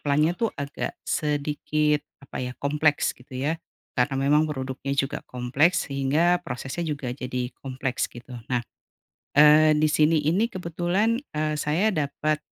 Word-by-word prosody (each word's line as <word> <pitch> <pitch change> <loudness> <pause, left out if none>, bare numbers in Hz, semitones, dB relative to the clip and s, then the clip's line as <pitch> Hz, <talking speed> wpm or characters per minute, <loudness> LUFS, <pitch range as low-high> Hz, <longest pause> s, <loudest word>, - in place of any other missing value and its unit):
plant-nya 150 +3 +2
tuh 230 - +2
agak 140 0 -4
sedikit, 150 0 0 0.2
apa - - -6
ya, 125 0 -3
kompleks 150 +1 +1
gitu 125 +1 -12
ya 155 +5 -1 0.4
karena 135 +2 +2 0.2
memang 150 +1 +5
produknya 135 -1 -3
juga 135 0 0
kompleks 140 +8 +1
sehingga 150 +6 +2
prosesnya 130 +7 -4
juga 140 -4 -3
jadi 125 -1 -4
kompleks 130 -1 -2
gitu. 120 +2 -12 0.2
Nah. 125 -2 0 0.7
Eee, 150 +1 +7
di 155 0 +2
sini 155 0 +3
ini 205 +7 +2
kebetulan, 185 +3 0 0.2
eee, 155 0 -1
saya 165 +10 +2
dapat, 155 -2 -1
150 Hz, 140 wpm, -25 LUFS, 135-155 Hz, 0.7 s, Eee